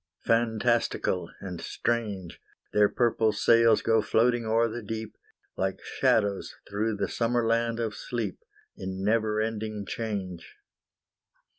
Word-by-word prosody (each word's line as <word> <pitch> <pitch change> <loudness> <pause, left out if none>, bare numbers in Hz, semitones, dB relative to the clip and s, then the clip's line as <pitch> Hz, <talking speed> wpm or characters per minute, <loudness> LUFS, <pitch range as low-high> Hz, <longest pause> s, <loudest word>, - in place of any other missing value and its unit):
Fantastical 115 -5 +1
and 90 -3 -6
strange, 105 -5 -2 0.3
Their 105 -1 +5
purple 115 -2 +2
sails 115 +1 +4
go 115 -1 +3
floating 115 +2 +2
o'er 115 +1 +3
the 120 +2 -5
deep, 110 +1 -5 0.4
Like 95 0 -1
shadows 100 -3 +1
through 105 +2 -1
the - - -1
summer 120 0 0
land 115 0 +1
of 110 -2 -1
sleep, 110 -4 -4 0.4
In 95 0 -5
never 110 0 +2
ending 110 -1 -3
change. 95 -6 -5
110 Hz, 120 wpm, -28 LUFS, 100-115 Hz, 0.4 s, Their